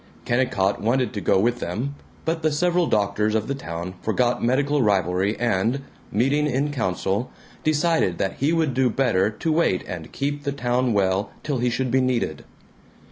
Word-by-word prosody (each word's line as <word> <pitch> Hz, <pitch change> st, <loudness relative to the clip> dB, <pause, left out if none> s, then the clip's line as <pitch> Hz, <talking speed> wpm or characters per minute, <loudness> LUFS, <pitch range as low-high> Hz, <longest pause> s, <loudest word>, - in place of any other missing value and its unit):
Kennicott 120 Hz, -6 st, +1 dB
wanted 125 Hz, +3 st, +1 dB
to 100 Hz, -, -3 dB
go 95 Hz, -, +3 dB
with 120 Hz, +4 st, +1 dB
them, 115 Hz, +11 st, -3 dB, 0.3 s
but 165 Hz, 0 st, -1 dB
the 155 Hz, 0 st, +2 dB
several 175 Hz, +3 st, +2 dB
doctors 105 Hz, 0 st, +1 dB
of 110 Hz, 0 st, 0 dB
the 140 Hz, -, -1 dB
town 85 Hz, -8 st, -5 dB
forgot 120 Hz, +2 st, 0 dB
medical 140 Hz, +4 st, +2 dB
rivalry 95 Hz, -1 st, +1 dB
and, 115 Hz, +3 st, +1 dB, 0.3 s
meeting 135 Hz, +8 st, +2 dB
in 140 Hz, +2 st, 0 dB
council, 100 Hz, -2 st, -1 dB, 0.3 s
decided 155 Hz, -, +2 dB
that 95 Hz, -, -2 dB
he 140 Hz, +4 st, +1 dB
would 160 Hz, -5 st, +1 dB
do 130 Hz, 0 st, +2 dB
better 110 Hz, -6 st, +2 dB
to 110 Hz, +9 st, -2 dB
wait 155 Hz, -, +2 dB
and 85 Hz, -4 st, -7 dB
keep 145 Hz, +1 st, -2 dB
the 140 Hz, -1 st, -2 dB
town 125 Hz, -2 st, 0 dB
well 95 Hz, 0 st, +1 dB
till 145 Hz, -4 st, -1 dB
he 125 Hz, +1 st, +1 dB
should 130 Hz, +1 st, -1 dB
be 130 Hz, -, +3 dB
needed. 120 Hz, -, -1 dB
120 Hz, 175 wpm, -23 LUFS, 100-140 Hz, 0.3 s, go